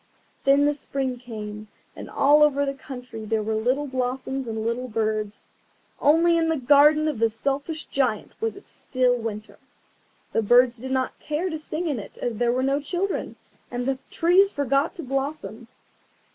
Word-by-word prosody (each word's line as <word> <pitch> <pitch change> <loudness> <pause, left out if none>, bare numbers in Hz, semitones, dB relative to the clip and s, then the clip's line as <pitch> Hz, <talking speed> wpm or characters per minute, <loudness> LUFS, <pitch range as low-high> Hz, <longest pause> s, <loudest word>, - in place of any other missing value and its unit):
Then 280 +1 +5
the 295 - +3
Spring 265 -3 -3
came, 215 -3 -7 0.3
and - - -9
all 290 +2 +4
over 285 -1 +4
the 275 - -2
country 250 -5 -9
there 215 0 -1
were 220 +1 -2
little 250 +7 0
blossoms 260 0 -3
and 220 -1 -3
little 240 +2 -2
birds. 215 -2 -2 0.5
Only 335 +3 +4
in 325 -1 +1
the 320 - +1
garden 295 +4 +5
of 295 -7 -2
the 230 0 +3
Selfish 280 +7 -3
Giant 255 -6 -1
it - - -32
was 450 -2 -1
still 255 -1 0
winter. 220 -2 -6 0.7
The - - +2
birds 245 +2 +4
did 260 +3 -6
not 260 -1 -1
care 315 +5 -2
to 315 - -4
sing 310 +3 -4
in 285 -7 -1
it 200 - -11
as 235 -3 -3
there 240 -1 +2
were 255 +1 0
no 275 +1 +1
children, 360 +6 -2 0.3
and 245 0 -3
the 265 0 -1
trees 370 +4 +4
forgot 280 - 0
to 335 - -6
blossom. 270 -3 -4
265 Hz, 175 wpm, -24 LUFS, 235-295 Hz, 0.7 s, Then